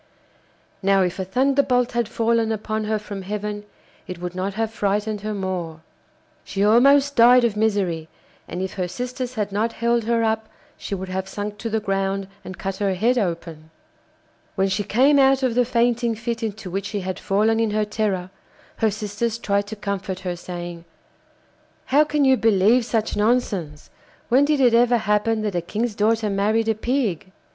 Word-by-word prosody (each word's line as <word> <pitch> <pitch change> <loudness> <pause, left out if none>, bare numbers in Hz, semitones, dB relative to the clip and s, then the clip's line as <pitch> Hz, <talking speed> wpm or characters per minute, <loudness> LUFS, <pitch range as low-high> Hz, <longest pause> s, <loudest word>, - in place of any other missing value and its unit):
Now 195 -1 +3
if 180 +1 -2
a - - 0
thunderbolt 255 +3 +2
had 235 -3 -1
fallen 230 -1 +1
upon 215 0 -2
her 215 0 0
from 205 -2 -7
heaven 210 +1 -4 0.4
it 180 -2 -7
would 180 0 -5
not 190 +2 -3
have 225 0 -1
frightened 210 0 -1
her 215 0 -3
more. 180 -5 -4 0.6
She 200 +1 -1
almost 275 +6 +5
died 245 +2 +7
of 230 -3 +1
misery, 195 -7 0 0.4
and 180 +2 -4
if 190 - -4
her 185 -2 -2
sisters 250 +5 -5
had 210 -2 -2
not 220 +3 -1
held 235 -1 0
her 230 0 +1
up, 220 0 -1 0.3
she 200 - -5
would 190 0 -6
have 190 +1 -3
sunk 205 +1 -5
to 230 - -3
the 220 0 0
ground 195 -1 -1 0.2
and 185 - -8
cut 195 0 -4
her 195 -2 0
head 240 +6 +2
open. 165 -5 -4 0.9
When 195 -1 +1
she 195 +2 -1
came 265 +8 +4
out 270 0 +4
of 255 -3 +1
the 245 +1 +3
fainting 235 -1 +1
fit 230 +1 -4
into 215 -4 -5
which 195 +2 -3
she 205 -2 -3
had 185 0 -4
fallen 215 +3 +1
in 225 -1 +1
her 210 0 0
terror, 205 -4 -2 0.5
her 220 - +2
sisters 215 +2 -3
tried 200 -2 -1
to 220 - -6
comfort 200 -2 -4
her, 180 -2 -3
saying: 175 -1 -7 1.0
'How 290 +3 +4
can 295 -1 +1
you 265 -1 +5
believe 225 +2 +3
such 225 -2 -1
nonsense? 205 -9 -1 0.4
When 260 +4 +5
did 295 -1 +1
it 245 -3 +5
ever 240 +1 +4
happen 215 +1 0
that 210 -2 -2
a 175 - 0
king's 215 +6 -2
daughter 220 +1 +1
married 215 +3 +1
a - - +3
pig? 215 - -2
210 Hz, 185 wpm, -22 LUFS, 195-235 Hz, 1.0 s, died